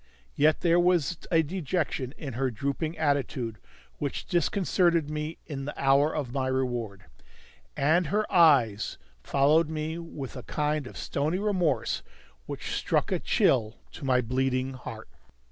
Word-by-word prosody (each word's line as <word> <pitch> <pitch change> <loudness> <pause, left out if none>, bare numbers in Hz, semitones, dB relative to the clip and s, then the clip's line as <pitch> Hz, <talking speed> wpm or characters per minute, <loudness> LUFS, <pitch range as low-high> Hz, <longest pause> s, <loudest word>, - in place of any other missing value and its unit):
Yet 150 +1 +3
there 170 -1 +4
was 175 -2 +2
a 165 -1 +4
dejection 155 -5 -2
in 140 -5 -6
her 130 +2 0
drooping 140 +7 -3
attitude 140 -6 -1 0.4
which 145 -2 -3
disconcerted 175 -3 +1
me 155 +1 -4
in 135 -3 -5
the 145 - -6
hour 140 +2 +4
of 135 -6 -3
my 135 -1 0
reward. 120 -6 -2 0.7
And 160 +4 +3
her 210 +6 +1
eyes 135 - +4 0.2
followed 150 - +3
me 160 +1 -3
with 150 -6 -7
a 125 - -6
kind 150 +2 -1
of - - -10
stony 155 +5 -1
remorse 180 - 0 0.5
which - - -5
struck - - 0
a - - +1
chill 110 -3 +2
to - - -11
my 130 -2 +3
bleeding 130 +2 0
heart. 130 - -8
145 Hz, 145 wpm, -28 LUFS, 130-165 Hz, 0.7 s, there